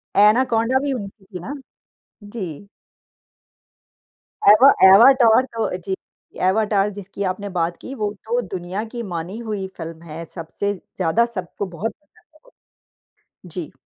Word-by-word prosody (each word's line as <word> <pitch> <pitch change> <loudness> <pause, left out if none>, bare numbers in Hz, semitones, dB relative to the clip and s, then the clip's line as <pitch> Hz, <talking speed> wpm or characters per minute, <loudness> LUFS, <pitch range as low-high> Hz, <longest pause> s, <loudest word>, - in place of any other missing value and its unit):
Anaconda 230 +4 +4
भी 285 -1 0
उनकी 200 -4 -7
थी 185 -2 -8
ना? 240 +12 -6 0.7
जी। 200 -4 -7 1.8
एवा 215 +7 +9 0.2
एवाटार 235 +4 +7
तो 225 - 0
जी। 190 +1 -4 0.5
एवाटार 205 0 +2
जिसकी 200 0 -6
आपने 200 +2 -5
बात 170 0 0
की 265 - -7
वो 205 -1 0
तो 240 +2 0
दुनिया 185 +3 -4
की 240 - -4
मानी 170 +5 -5
हुई 200 -3 -3
फ़िल्म 165 -1 -7
है। 160 +2 -6
सबसे 185 +5 -3
ज़्यादा 190 +3 0
सबको 185 +2 -4
बहुत 225 +5 -2 1.5
जी। 175 -2 -6
200 Hz, 120 wpm, -21 LUFS, 180-225 Hz, 1.8 s, एवा